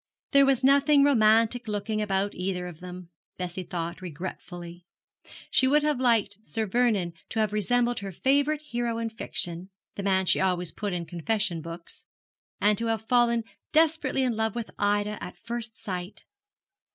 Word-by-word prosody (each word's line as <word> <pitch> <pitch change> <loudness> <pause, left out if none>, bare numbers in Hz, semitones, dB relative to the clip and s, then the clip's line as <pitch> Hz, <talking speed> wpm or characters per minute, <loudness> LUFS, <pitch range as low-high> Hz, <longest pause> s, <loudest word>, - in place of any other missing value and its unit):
There 275 -1 +6
was 265 -1 +2
nothing 280 +1 +5
romantic 230 -2 +4
looking 215 +1 -2
about 200 -1 0
either 180 0 -3
of 175 -3 -8
them, 180 -1 -9 0.3
Bessie 180 0 -4
thought, 170 0 -5
regretfully. 175 0 -7 0.7
She 260 - +5
would 295 +2 +4
have 300 -4 +1
liked 220 -5 +2
Sir 220 0 -2
Vernon 210 -6 +1 0.2
to 225 - -2
have 215 -1 +1
resembled 240 +3 +1
her 200 -1 -6
favourite 285 - +1
hero 240 -4 -2
in 230 -1 -3
fiction 180 -5 -3 0.2
(the - - -5
man 190 -1 +2
she - - +4
always 180 -2 0
put 205 -2 -4
in 175 -1 -3
confession 175 +1 -1
books), 170 +1 -10 0.5
and 210 0 +3
to 230 - -1
have 225 -1 -1
fallen 235 -2 +3 0.3
desperately 310 -4 +3
in 245 -3 0
love 220 0 -1
with 235 -2 -4
Ida 205 +1 0
at - - -8
first 235 -1 -5
sight. 180 0 -6
215 Hz, 165 wpm, -27 LUFS, 185-240 Hz, 0.7 s, There